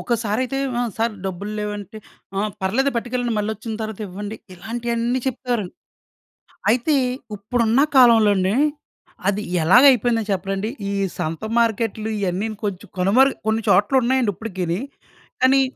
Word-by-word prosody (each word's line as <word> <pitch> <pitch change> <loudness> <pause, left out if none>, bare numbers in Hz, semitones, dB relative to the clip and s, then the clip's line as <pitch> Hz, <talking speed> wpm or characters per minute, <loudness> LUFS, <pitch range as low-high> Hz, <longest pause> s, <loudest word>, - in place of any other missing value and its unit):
ఒకసారైతే, 235 +3 -1 0.2
ఆ! - - +1 0.2
సర్ 225 -1 0
డబ్బులేవంటే, 205 +2 -5 0.4
"ఆ! - - +1 0.2
పర్లేదు 260 +9 +1
పట్టుకెళ్ళండి 240 0 -1
మలోచ్చిన 220 +1 -3
తరువాత 220 -1 -5
ఇవ్వండి" 205 +4 -6 0.2
ఇలాంటివన్నీ 235 +5 -2
చెప్తారండి. 240 -6 -2 1.0
అయితే 250 +7 +2 0.4
ఇప్పుడున్న 230 +4 +1 0.2
కాలంలోనే 215 -6 +5 0.7
అది 205 +1 +1 0.2
యెలాగయిపోయిందో 240 - +5
చెప్పనండి 195 +2 -2 0.2
ఈ - - -2 0.2
సంత 160 +3 -3
మార్కెట్‌లు 225 -1 0
ఇయన్నీను 200 +3 -2
కొంచెం 200 0 -4
కనుమరుగు 235 +9 +4
కొన్ని 220 +1 +1
చోట్ల 200 +6 +3
ఉన్నాయండి 250 -2 +2
ఇప్పటికిని, 185 -5 -3 0.6
కానీ 265 +1 +5
220 Hz, 110 wpm, -21 LUFS, 200-240 Hz, 1.0 s, కాలంలోనే